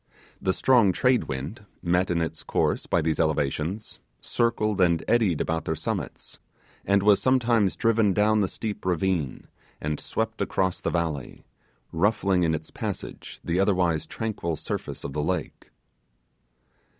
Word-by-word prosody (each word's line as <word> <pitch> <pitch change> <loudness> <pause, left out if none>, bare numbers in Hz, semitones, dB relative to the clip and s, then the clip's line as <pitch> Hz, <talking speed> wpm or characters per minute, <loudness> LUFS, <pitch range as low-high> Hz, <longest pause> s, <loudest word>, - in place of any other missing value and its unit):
The 95 - +2
strong 115 -1 +4
trade 125 +4 +2
wind, 70 - -5 0.2
met 90 +2 +2
in 85 -1 +1
its 80 -1 -4
course - - 0
by 85 - +2
these 80 -1 0
elevations, 80 +6 -1 0.2
circled 110 -4 0
and 85 -2 +3
eddied 105 -9 +3
about 80 0 -1
their 80 - -1
summits, - - -5 0.4
and 100 0 +2
was 105 -1 +5
sometimes 120 -8 +3
driven 115 0 +3
down 105 +2 +3
the 100 - +2
steep 105 +2 -5
ravine 90 -5 -1 0.3
and 75 0 -2
swept - - -3
across 95 -1 0
the - - 0
valley, 80 -6 -3 0.5
ruffling 95 +1 +2
in 80 -2 +2
its 80 0 -7
passage - - -6
the 85 +2 0
otherwise 90 -5 +2
tranquil 105 -7 -3
surface - - -5
of 70 - -5
the 75 - -1
lake. - - -3
90 Hz, 145 wpm, -26 LUFS, 80-105 Hz, 0.5 s, was